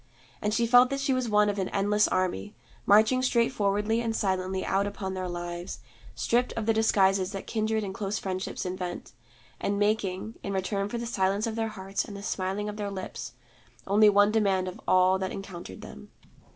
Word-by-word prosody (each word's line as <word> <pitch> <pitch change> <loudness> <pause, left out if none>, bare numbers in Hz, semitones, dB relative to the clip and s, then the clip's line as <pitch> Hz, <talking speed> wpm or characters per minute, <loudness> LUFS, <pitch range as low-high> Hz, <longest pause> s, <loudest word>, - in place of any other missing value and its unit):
And 210 - 0
she 235 +2 +2
felt 245 +2 +6
that 275 0 -2
she 275 -1 +1
was 255 -2 -1
one 210 0 +4
of 205 -1 -1
an 190 - -1
endless 210 +1 +2
army, 185 +3 -1 0.3
marching 220 +5 +5
straightforwardly 225 -3 +1
and 225 -1 -2
silently 190 -2 -1
out 195 +1 +1
upon 195 -2 -4
their 185 -1 -3
lives, 175 0 -5 0.4
stripped 245 +2 +1
of 225 - -3
the 225 - +3
disguises 195 -3 +2
that 195 - -5
kindred 220 -1 -1
and 195 -2 -4
close 200 +1 -3
friendship 185 -1 -4
invent, 180 -1 -5 0.5
and 200 0 -1
making, 205 0 -1
in 200 - -4
return 195 +1 -1
for 235 - -3
the 235 - -4
silence 200 -2 0
of 225 -1 -3
their 225 -1 -1
hearts 195 -2 -3
and 205 - -8
the 200 - -9
smiling 195 0 -2
of 210 0 -5
their 205 -1 -3
lips, 190 -10 -6 0.5
only 210 +2 +5
one 205 0 +5
demand 195 -4 +2
of 185 - -7
all 185 +1 +4
that 190 0 -2
encountered 175 - -8
them. 70 0 -11
200 Hz, 190 wpm, -28 LUFS, 190-220 Hz, 0.5 s, felt